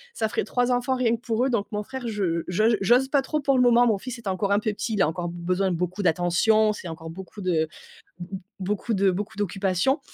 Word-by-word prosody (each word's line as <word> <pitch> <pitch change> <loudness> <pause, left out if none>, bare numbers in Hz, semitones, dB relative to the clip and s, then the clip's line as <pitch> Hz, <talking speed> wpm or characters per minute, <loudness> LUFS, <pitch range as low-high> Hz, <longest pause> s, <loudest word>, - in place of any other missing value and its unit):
ça 220 - 0
ferait - - -1
3 245 0 0
enfants, 250 +2 +1
rien 235 -2 +2
que 230 - -12
pour 240 0 0
eux. - - +1
Donc, 210 -4 0
mon 210 0 -2
frère, 260 +1 -6
je 185 -6 -1
j'o 180 +5 +1 0.2
j'ose 245 +7 +4
pas 280 -2 +3
trop, 305 +3 -2
pour 275 -1 +2
le - - +4
moment. 245 0 +5
Mon 215 -4 +2
fils 255 +1 -6
est 230 - -10
encore 195 +1 -1
un 200 - +4
peu 215 0 -1
petit. 220 +2 -3
Il 205 - +1
a - - +3
encore 175 +2 -3
b - - -8
besoin 180 +2 0
de - - 0
beaucoup 180 +3 -2
d'attention. 185 +6 +3
C'est 185 - -8
encore 160 0 -7
beaucoup 190 +3 -10
de 165 -4 +1 0.5
b - - -4
b - - -3 0.2
beaucoup 210 +4 -1
de 195 0 +3
beaucoup 210 +4 -4
d'occupation, 200 - 0
210 Hz, 260 wpm, -25 LUFS, 185-240 Hz, 0.5 s, moment